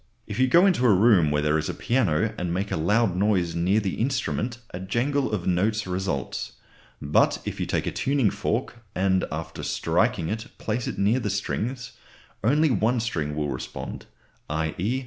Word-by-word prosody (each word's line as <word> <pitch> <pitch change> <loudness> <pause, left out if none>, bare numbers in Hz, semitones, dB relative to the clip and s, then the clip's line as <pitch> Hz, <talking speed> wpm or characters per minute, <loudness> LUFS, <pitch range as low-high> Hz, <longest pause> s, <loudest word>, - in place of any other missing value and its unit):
If - - -5
you 130 - +4
go 170 +8 +6
into 180 -10 +3
a 105 - +6
room 95 -6 +5
where 75 0 +1
there 75 +1 +2
is 75 - -3
a - - -3
piano 105 -11 +1
and 90 -1 -3
make 95 +4 -2
a - - +1
loud 100 +4 +2
noise 95 -3 +1
near 90 +5 +2
the 100 -4 -3
instrument 125 -2 -1
a 90 - -6
jangle 125 +9 0
of 100 -5 -2
notes 105 +4 +1
results. 90 -7 -3 0.5
But 70 +1 +2
if - - -5
you - - -2
take - - -1
a - - -1
tuning 135 -7 +1
fork 110 +3 -3
and 95 0 +2
after 80 +1 -5
striking 80 - 0
it 110 +1 -4
place 115 +2 -2
it - - -4
near 105 +6 +2
the 105 - -2
strings, 120 +5 -3 0.5
only 150 +6 +3
one 115 +3 +2
string 80 -10 -2
will 75 -1 -1
respond, 65 -2 -6 0.4
_i.e. 80 - -1
100 Hz, 185 wpm, -25 LUFS, 85-120 Hz, 0.5 s, go